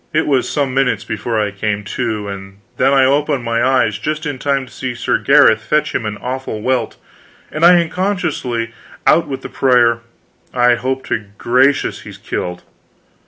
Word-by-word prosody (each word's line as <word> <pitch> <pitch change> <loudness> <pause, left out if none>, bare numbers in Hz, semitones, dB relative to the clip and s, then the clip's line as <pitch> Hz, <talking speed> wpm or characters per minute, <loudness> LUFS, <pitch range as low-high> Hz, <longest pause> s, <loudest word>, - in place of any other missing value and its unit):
It 155 0 +2
was 135 -3 +1
some 140 -3 -1
minutes 135 -2 +1
before 115 -2 -2
I 105 -1 0
came 100 +1 -2
to, 110 0 -3
and 95 -1 -8 0.2
then 135 +2 +3
I 135 -1 +5
opened 140 -1 +1
my 115 0 0
eyes 125 -6 +2
just 155 +1 -3
in 145 -3 -4
time 140 -1 0
to 125 - -17
see 130 -2 -5
Sir 120 - 0
Gareth 110 0 +5
fetch 150 +7 0
him 110 - -2
an 105 0 -4
awful 130 -2 -4
welt, 125 -3 0 0.6
and 155 - -3
I 175 +1 +8
unconsciously 160 - -2 0.3
out 165 - +4
with 135 -2 -5
the - - -5
prayer, 120 -3 +3 0.6
"I 125 0 +4
hope 130 +3 -2
to 105 - -1
gracious 130 +4 +2
he's - - -11
killed!" 90 0 -5
125 Hz, 175 wpm, -17 LUFS, 115-140 Hz, 0.6 s, I